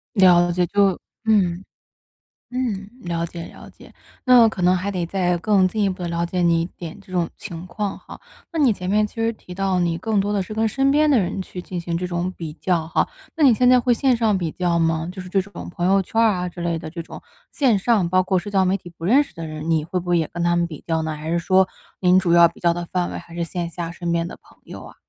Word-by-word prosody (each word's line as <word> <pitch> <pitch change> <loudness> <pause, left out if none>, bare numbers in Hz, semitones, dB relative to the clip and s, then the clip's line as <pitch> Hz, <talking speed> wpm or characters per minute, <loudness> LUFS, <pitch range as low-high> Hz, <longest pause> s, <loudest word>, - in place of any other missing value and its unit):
了 175 -2 +5
解， 180 0 +1
就 200 -1 +2 0.3
嗯。 190 -4 +2 0.9
嗯， 210 -6 -2
了 170 -1 -2
解 170 0 -8
了 - - -13
解。 - - -17 0.3
那 245 -3 +7
可 190 - -6
能 180 +1 +4
还 195 +3 -2
得 180 -3 -2
再 180 -1 0
更 195 0 +3
进 215 0 -1
一 - - +2
步 185 -1 -5
地 170 - -3
了 170 0 -1
解 180 +1 -2
你 170 -1 +3
一 - - -1
点 170 +1 -9
这 200 - -19
种 175 -2 -1
情 170 +1 -8
况 200 +1 -4
哈， - - -12 0.3
那 330 - -3
你 255 -7 +4
前 180 -1 -5
面 210 +1 +2
其 - - -21
实 225 0 0
提 180 -5 -12
到 190 -2 0
你 170 -1 0
更 215 +2 0
多 205 +1 0
的 195 -2 0
是 215 - -8
跟 220 +1 +1
身 270 +5 +1
边 300 +1 +3
的 270 - +5
人 190 0 -1
去 180 -1 -8
进 180 -1 -6
行 170 0 -3
这 180 - -3
种 175 +1 -2
比 160 -3 -6
较 170 0 -1
哈， - - +1 0.3
那 310 - +2
你 250 - +7
现 250 +3 +3
在 250 0 +6
会 245 0 +2
线 255 -1 +2
上 215 -4 +2
比 170 -4 -2
较 175 -2 0
吗？ 165 0 0
就 185 0 -7
是 180 - -10
这 195 0 +2
种 200 -1 -9
朋 175 0 -3
友 195 0 +4
圈 225 +5 -2
儿 225 - +6
啊 180 0 -3
之 175 - -12
类 170 -1 -1
的 155 0 -7
这 170 +1 -6
种， - - -11 0.3
线 245 -8 +3
上 200 -5 +2
包 185 0 +4
括 185 0 0
社 195 +4 -4
交 190 -2 +2
媒 185 +2 +2
体 180 -2 -8
不 165 0 -9
认 270 +9 +5
识 - - -18
的 165 -1 -7
人， 155 +1 -4
你 155 -1 +1
会 180 +1 -2
不 175 - -7
会 175 -1 +3
也 160 - -1
跟 170 0 -4
他 175 0 +2
们 170 0 +1
比 155 -3 -10
较 160 -1 0
呢？ 155 -1 -3
还 155 +2 -6
是 170 - +1
说 185 +2 +3 0.3
您 180 0 +5
主 175 -3 +1
要 170 -1 +7
比 - - -18
较 170 -1 +2
的 175 0 -5
范 180 -1 -1
围 - - -4
还 170 - -11
是 170 0 -2
线 170 0 -4
下 170 -1 -5
身 175 -1 -3
边 170 0 0
的 - - -9
朋 - - -22
友 - - -9
啊？ - - -13
180 Hz, 300 characters per minute, -22 LUFS, 170-200 Hz, 0.9 s, 那